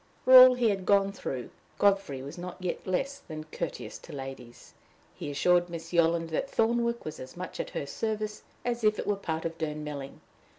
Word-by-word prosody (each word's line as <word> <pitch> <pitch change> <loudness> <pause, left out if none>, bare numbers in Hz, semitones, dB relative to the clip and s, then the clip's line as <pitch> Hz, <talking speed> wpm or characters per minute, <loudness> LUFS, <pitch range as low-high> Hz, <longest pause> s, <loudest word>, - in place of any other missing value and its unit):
For 260 - +5
all 255 0 +11
he 240 -2 +2
had 195 -2 -4
gone 200 -1 +4
through, 130 -10 -5 0.3
Godfrey 195 -10 +2
was 140 - -7
not 180 0 -7
yet 180 0 -4
less 275 +10 -1
than 155 -1 -8
courteous 160 +1 -6
to - - -13
ladies. 135 -3 -9 0.4
He - - -6
assured 175 +4 +3
Miss 165 0 -7
Yolland 165 -1 +3
that 215 - -1
Thornwick 235 +1 +1
was 155 0 -6
as 130 +5 -10
much 180 +1 -6
at - - -3
her - - -2
service 215 +7 -3 0.2
as 240 -1 -1
if 215 0 +3
it - - -3
were 205 - +2
a - - -5
part 160 -4 -3
of 165 0 -4
Durnmelling. 150 -3 -5
175 Hz, 200 wpm, -29 LUFS, 150-210 Hz, 0.4 s, all